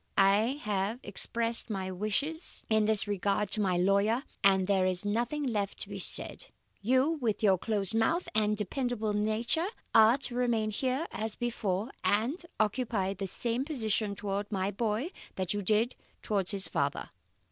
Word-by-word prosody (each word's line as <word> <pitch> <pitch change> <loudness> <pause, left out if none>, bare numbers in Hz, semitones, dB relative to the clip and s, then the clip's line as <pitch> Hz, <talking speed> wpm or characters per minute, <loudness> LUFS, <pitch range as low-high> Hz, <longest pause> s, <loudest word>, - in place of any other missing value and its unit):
I 210 +8 +3
have 210 +2 -1
expressed 230 +4 -1
my 190 -3 -3
wishes 215 - -2
in 220 -1 +4
this 215 -1 +5
regard 205 0 0
to 215 - +3
my 185 -3 +1
lawyer, 200 +7 +2 0.2
and 190 -1 +5
there 190 -1 +2
is 185 +1 +1
nothing 240 +8 -1
left 210 -7 -2
to - - -2
be - - -6
said. - - -1 0.3
You, 260 +8 +2
with 220 -3 -1
your 190 -3 +4
close 205 -2 0
mouth 230 +11 +1
and 210 -1 +2
dependable 220 0 -1
nature, 220 - 0 0.3
are 225 +3 +7
to 270 -2 -2
remain 235 -3 0
here 260 +7 -1
as 220 0 -4
before, 225 -2 -2
and 235 - +1 0.2
occupy 215 -3 0
the 195 0 -5
same 235 +6 -1
position 220 -8 -1
towards 200 +1 -3
my 195 0 -1
boy 225 - -2 0.2
that 185 -1 0
you 205 - -2
did 215 +5 +2 0.3
towards 195 -4 0
his 195 -3 0
father. 140 -3 -2
215 Hz, 160 wpm, -30 LUFS, 200-240 Hz, 0.3 s, are